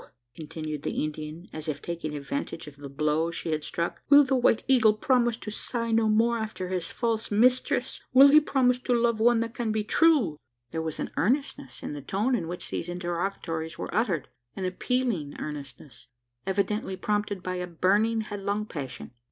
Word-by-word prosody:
continued 155 -1 -6
the - - -2
Indian, 155 +2 -5
as 155 0 -6
if 145 -2 -2
taking 165 -3 -5
advantage 140 +3 -4
of 150 -2 -11
the 140 -1 -8
blow 150 +3 0
she 170 -1 -3
had 155 -1 -1
struck, 170 +3 -3
"will 290 0 +9
the 265 -1 +1
White 245 -3 +3
Eagle 225 -5 +5
promise 240 0 +2
to 215 - -7
sigh 230 +1 -3
no 225 -1 +3
more 230 +2 +3
after 215 -4 -4
his 180 -3 -2
false 230 -2 -1
mistress? 250 +3 +2
Will 270 +2 +9
he 300 +2 +8
promise 255 -4 +2
to 250 -1 0
love 235 -1 +2
one 235 0 +4
that 230 0 -3
can 235 -3 -2
be 215 0 0
true?" 240 - +3 0.3
There 160 - -2
was 160 -1 -4
an - - -3
earnestness 275 - -1
in - - -4
the 145 - -6
tone 205 - 0
in 220 -9 0
which 180 +1 -6
these 170 - -3
interrogatories 175 -2 -3
were - - -5
uttered 190 - 0 0.3
an 190 - -3
appealing 185 - -1
earnestness 135 -4 -8 0.4
evidently 195 0 -1
prompted 205 -2 -1
by 185 0 -3
a 180 0 -3
burning 205 +6 +2
headlong 205 0 -3
passion. 145 -12 -7
200 Hz, 185 wpm, -27 LUFS, 160-235 Hz, 0.4 s, will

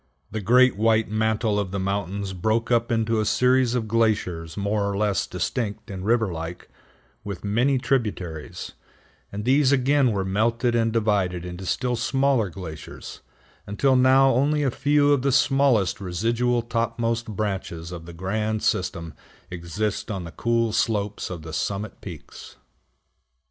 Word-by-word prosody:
The 110 +1 -3
great 125 +3 +4
white 110 0 +2
mantle 110 0 0
on 100 -2 -2
the 100 - -4
mountains 100 0 -2
broke 110 +6 0
up 115 0 +2
into 115 -1 +1
a - - +1
series 125 +1 +3
of 115 -3 -1
glaciers 105 -8 0
more 100 0 0
or 100 - -2
less 105 -3 0
distinct 110 -2 -3
and 95 -1 -6
river 110 -3 +1
like, 80 +1 -7 0.5
with 100 -3 -6
many 120 +7 +2
tributaries, 105 - -3 0.6
and 105 +1 -5
these 135 +1 +4
again 135 -1 +3
were 100 -2 -1
melted 115 +5 +1
and 115 -1 +2
divided 100 -6 0
into 90 +1 -7
still 125 +4 0
smaller 130 -1 +1
glaciers, 85 -3 -9 0.5
until 130 +7 +2
now 130 +1 +5
only 145 +4 +2
a 135 - +1
few 145 +2 +3
of 140 - +1
the 140 +1 +1
smallest 135 -7 +2
residual 115 +6 0
topmost 115 0 -1
branches 95 -5 -4
of 85 -2 -8
the 85 - -9
grand 105 +5 -2
system 85 -3 -1 0.4
exist 90 +6 -3
on 95 -4 -3
the 85 - -8
cool 115 +1 0
slopes 105 -3 -1
of 85 -4 -7
the 80 -1 -8
summit 100 +5 -3
peaks. 85 -6 -10
110 Hz, 150 wpm, -24 LUFS, 95-120 Hz, 0.6 s, now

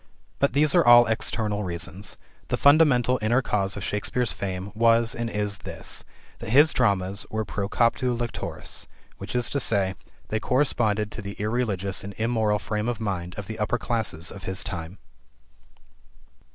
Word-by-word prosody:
But 140 - +2
these 145 +1 +3
are - - +5
all 120 0 +8
external 110 -2 0
reasons. 90 +2 -4 0.3
The - - -1
fundamental 140 -4 +5
inner 120 +5 +2
cause 100 -3 0
of 100 - -5
Shakespeare's 110 +3 -1
fame 95 0 -5
was 115 +2 +3
and 120 -2 -3
is 105 -2 -2
this: - - -6 0.4
that 115 - -7
his 145 +6 +5
dramas 100 -4 +1
were 110 0 -2
"pro 100 0 -3
captu 120 +1 +1
lectoris," 120 -1 -5 0.3
i.e., 115 -6 0 0.3
they 110 - 0
corresponded 110 -5 +1
to - - -6
the 100 -1 -6
irreligious 105 -4 -2
and 100 0 -7
immoral 110 -2 +1
frame 105 +4 -2
of 120 - -3
mind 90 -5 -3
of 100 - -5
the 110 +1 -7
upper 105 +3 0
classes 110 -9 -2
of 95 -3 -10
his 95 -1 -1
time. 85 +1 -6
110 Hz, 150 wpm, -25 LUFS, 100-120 Hz, 0.4 s, all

